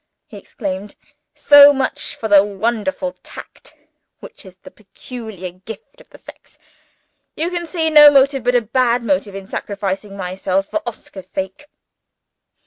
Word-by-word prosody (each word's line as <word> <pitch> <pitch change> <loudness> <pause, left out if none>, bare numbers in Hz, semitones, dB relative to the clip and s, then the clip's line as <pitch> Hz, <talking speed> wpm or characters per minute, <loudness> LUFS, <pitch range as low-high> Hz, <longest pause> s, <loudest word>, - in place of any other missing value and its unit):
he - - -15
exclaimed. 195 -1 -7 0.4
"So 290 0 +8
much 270 -1 -3
for 220 - -5
the 200 -2 +6
wonderful 230 +7 -3
tact - - -13 0.4
which - - -14
is 185 0 -15
the - - -15
peculiar 215 -2 -10
gift 195 +4 -13
of - - -22
the - - -16
sex! - - -16 0.8
You 330 +3 -3
can 345 -1 -4
see 320 -2 -1
no 300 -1 +9
motive 275 -2 +2
but 245 0 +2
a 245 - +4
bad 240 +1 0
motive 195 -2 -1
in 195 - -7
my 190 - -20
sacrificing 195 0 -5
myself 190 +1 -2
for 315 - -3
Oscar's 190 -4 -12
sake?" 190 +9 -6
220 Hz, 150 wpm, -18 LUFS, 195-270 Hz, 0.8 s, no